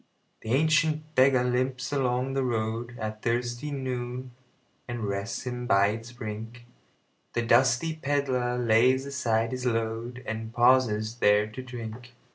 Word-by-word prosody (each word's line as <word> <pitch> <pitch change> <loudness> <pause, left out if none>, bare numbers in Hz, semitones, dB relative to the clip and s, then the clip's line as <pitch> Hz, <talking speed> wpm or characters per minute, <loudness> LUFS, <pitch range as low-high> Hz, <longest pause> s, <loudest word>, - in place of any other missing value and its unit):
The 110 - -5
ancient 155 +1 +2
beggar 130 -2 +5
limps 125 +2 -1
along 130 -1 0
the 135 - 0
roadAt 110 -2 -3
thirsty 120 +4 -1
noon, 130 -2 -4 0.6
and 120 -2 -4
rests 100 0 -3
him 125 -1 -4
by 100 -1 +4
its 115 +3 -5
brink; 115 +1 -7 0.7
The 120 - 0
dusty 130 +7 +3
pedlar 135 -4 0
lays 125 +3 +3
aside 115 -5 0
his 130 0 -2
load, 115 +2 -2
And 110 0 -4
pauses 120 -3 +3
there 105 -2 +4
to 130 - -6
drink. 120 -1 -8
120 Hz, 130 wpm, -27 LUFS, 115-130 Hz, 0.7 s, beggar